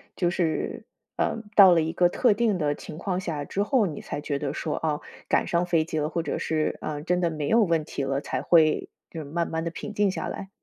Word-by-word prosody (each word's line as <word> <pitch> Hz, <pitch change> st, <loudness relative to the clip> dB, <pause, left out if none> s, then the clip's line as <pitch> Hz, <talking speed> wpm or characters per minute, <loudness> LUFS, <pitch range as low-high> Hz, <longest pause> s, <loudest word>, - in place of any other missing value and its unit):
就 175 Hz, -2 st, +1 dB
是， 170 Hz, -3 st, -2 dB, 0.3 s
呃， -, -, 0 dB, 0.2 s
到 195 Hz, -3 st, +9 dB
了 165 Hz, -2 st, +5 dB
一 160 Hz, +1 st, -2 dB
个 175 Hz, 0 st, +3 dB
特 235 Hz, +3 st, +3 dB
定 210 Hz, -3 st, +1 dB
的 145 Hz, -3 st, 0 dB
情 150 Hz, -, -9 dB
况 180 Hz, +1 st, -2 dB
下 155 Hz, -6 st, -4 dB
之 200 Hz, -, -1 dB
后， 220 Hz, 0 st, +2 dB
你 155 Hz, -5 st, -5 dB
才 -, -, -5 dB
觉 145 Hz, -2 st, -2 dB
得 145 Hz, -1 st, -3 dB
说， 155 Hz, -1 st, -3 dB
哦， 150 Hz, -2 st, -1 dB, 0.3 s
赶 -, -, +2 dB
上 170 Hz, +1 st, +1 dB
飞 165 Hz, -3 st, +2 dB
机 160 Hz, -2 st, -3 dB
了， 150 Hz, +1 st, -1 dB
或 170 Hz, -1 st, -2 dB
者 -, -, -2 dB
是， 155 Hz, -1 st, -1 dB
嗯， 150 Hz, 0 st, -4 dB
真 180 Hz, +1 st, +1 dB
的 170 Hz, -, +2 dB
没 150 Hz, -2 st, -3 dB
有 230 Hz, +8 st, +4 dB
问 165 Hz, -4 st, +1 dB
题 140 Hz, -, -4 dB
了， 135 Hz, 0 st, 0 dB
才 130 Hz, -, -3 dB
会 155 Hz, 0 st, +3 dB, 0.2 s
就 165 Hz, -, -7 dB
是 -, -, -8 dB
慢 165 Hz, +4 st, -2 dB
慢 160 Hz, 0 st, -2 dB
地 170 Hz, -, -3 dB
平 210 Hz, -, -7 dB
静 205 Hz, -2 st, +2 dB
下 -, -, -4 dB
来？ 195 Hz, -, -6 dB
165 Hz, 270 characters per minute, -26 LUFS, 150-180 Hz, 0.3 s, 到